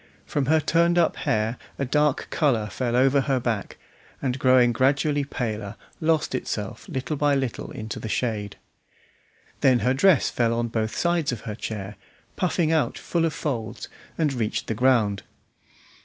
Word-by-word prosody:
From 140 -3 -1
her 160 +2 +4
turned 170 +2 +2
up 170 -2 +3
hair 110 +2 -1 0.2
a 140 - -1
dark 150 +2 +1
colour 120 -9 +1
fell 120 -2 -1
over 135 +2 +4
her 135 -1 0
back, 115 -4 -3 0.4
and 130 -1 -2
growing 130 -2 +5
gradually 140 +3 +2
paler, 110 -6 -4 0.2
lost 160 -3 +1
itself 105 - -4
little 135 -1 -3
by 145 0 +2
little 130 -4 -3
in 110 - -7
the 110 0 -5
shade. 105 -4 -2 1.0
Then 130 -2 +4
her 125 +4 +2
dress 155 +2 +4
fell 115 -1 +1
on 120 0 -1
both 110 -1 -2
sides 170 -5 +1
of 120 -4 -5
her 110 -2 -5
chair, 105 -1 -6 0.4
puffing 175 -3 +1
out 160 -2 +1
full 170 -1 0
of 160 - -1
folds, 115 -6 -4 0.3
and 150 -4 +1
reached 115 -4 -2
the - - -2
ground. 110 -4 +2
130 Hz, 160 wpm, -25 LUFS, 110-150 Hz, 1.0 s, growing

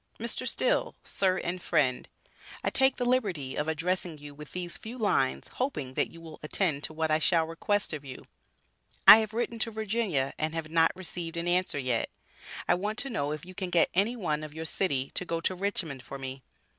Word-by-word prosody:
Mr. - - -1
Still: - - +1
Sir 190 -1 +1
and 180 0 -3
Friend 130 -7 +1 0.5
I - - +1
take 265 0 +4
the 245 - -2
liberty 195 - 0
of 150 - -1
addressing 170 +1 -1
you 145 0 -10
with 150 0 -11
these 175 -1 -4
few 230 +3 -7
lines 70 - +1
hoping 150 - -3
that - - +1
you 165 - -13
will 165 -1 -11
attend 150 -2 +1
to - - -8
what 160 0 0
I 155 - +4
shall 165 0 +3
request 185 +4 0
of 150 -2 -5
you. 130 -2 -9 0.8
I 220 - +13
have 220 0 -3
written 235 0 -1
to 230 - +2
Virginia 215 - -1
and 155 +1 -1
have 160 -1 -4
not 165 0 +5
received 175 -2 -5
an 170 +1 -2
answer 180 -3 +1
yet. 125 -4 0 0.6
I - - +5
want 205 +4 -2
to 275 - -1
know 145 -10 -1
if 155 +1 -5
you 185 - -10
can 185 -1 -4
get 170 -1 +3
any 205 +7 +2
one 155 -9 -1
of 155 0 -8
your 160 0 -4
city 140 -6 0
to - - -2
go 170 -2 -2
to 185 - 0
Richmond 180 -7 -2
for 140 - -8
me. 135 0 -6
170 Hz, 210 wpm, -29 LUFS, 150-200 Hz, 0.8 s, I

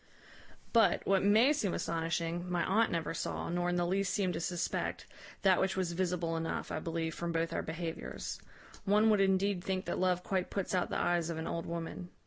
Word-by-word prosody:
"But, 225 -3 +4
what 195 -1 +3
may 220 +8 +5
seem 210 - -1
astonishing, 165 +1 -2
my 175 -1 +1
aunt 220 +4 +3
never 165 -1 -1
saw, - - -3
nor 175 +1 0
in 175 - 0
the 175 0 +1
least 190 +2 0
seemed 185 -3 0
to - - -3
suspect, 175 +1 -2 0.4
that 190 -2 +5
which 190 0 0
was 185 -2 0
visible 170 -2 -1
enough, 165 0 -3
I - - -2
believe, 165 0 -2
from 170 +1 -3
both 165 0 -1
our - - 0
behaviours. 165 0 -5 0.4
One 210 +2 +4
would 210 -2 +4
indeed 195 -1 +2
think 190 -1 -2
that - - -2
love 180 -1 +1
quite 185 -2 -1
puts 195 -2 -2
out 180 -1 +1
the - - -1
eyes 175 -1 +1
of 165 - -3
an 160 - -4
old 165 -1 -3
woman. 170 +1 -5
175 Hz, 205 wpm, -33 LUFS, 165-195 Hz, 0.4 s, may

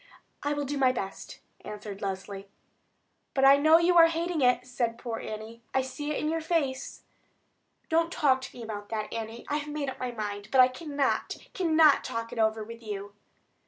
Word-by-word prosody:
"I 290 +1 0
will 290 -1 -2
do 285 +1 -3
my 260 -2 +5
best," 195 -6 -6 0.2
answered 205 -1 -8
Leslie. 195 0 -5 0.9
"But 270 -1 +4
I 275 +1 +8
know 310 +3 +6
you 345 +1 +3
are 330 - +9
hating 335 -1 -1
it," 250 -1 +3
said 240 -2 -2
poor 235 -2 -5
Annie. 220 +2 -7
"I 265 - +3
see 265 +3 -5
it 300 - -1
in 305 - -1
your 325 +1 -1
face." 295 -5 -2 0.8
"Don't 330 +1 +2
talk 265 -5 +2
to 260 - -9
me 240 - -7
about 205 -2 -6
that, 215 -1 -4
Annie. 225 +1 -6
I 295 - 0
have 300 0 -5
made 295 -2 -3
up - - -11
my 250 - -2
mind; 205 -3 -5
but 265 - +3
I 255 0 +8
cannot, 285 +1 -1 0.2
cannot 320 -5 +4
talk 230 0 -4
it 230 - -5
over 220 0 +2
with 230 +2 -10
you." 205 -2 -6
255 Hz, 195 wpm, -28 LUFS, 220-295 Hz, 0.9 s, are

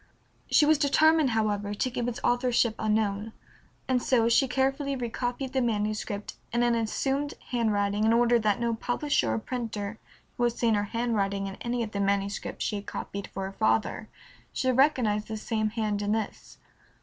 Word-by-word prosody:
She 300 - +5
was 305 -1 +4
determined, 310 0 +4
however, 205 -2 0
to 255 +5 -1
keep 240 -1 -2
its 245 -1 -3
authorship 245 -2 +2
unknown, 215 0 0 0.5
and 255 -1 +2
so 235 -3 +3
she 265 +3 +4
carefully 270 +2 0
recopied 245 +1 -3
the 265 - +2
manuscript 210 -2 -2
in 235 +1 +1
an 240 0 +3
assumed 270 +5 -1 0.2
handwriting 210 -3 +1
in 220 - +4
order 240 +1 +4
that 210 -1 +1
no 235 -1 0
publisher 245 - 0
or 110 - 0
printer 220 - -4 0.4
who 245 - 0
had 240 - +1
seen 235 -1 +1
her 205 -1 +1
handwriting 200 -3 -1
in 195 - -5
any 240 0 -1
of 220 - -6
the 200 - -3
manuscripts 200 0 -1
she 210 - -1
had 200 - -8
copied 200 0 -5
for 195 - -5
her 190 - -5
father 220 +1 0 0.4
should 255 -1 0
recognize 245 -7 +3
the 220 0 -5
same 215 0 -1
hand 215 -2 -2
in 205 +1 0
this. 220 -2 -4
225 Hz, 175 wpm, -28 LUFS, 205-245 Hz, 0.5 s, She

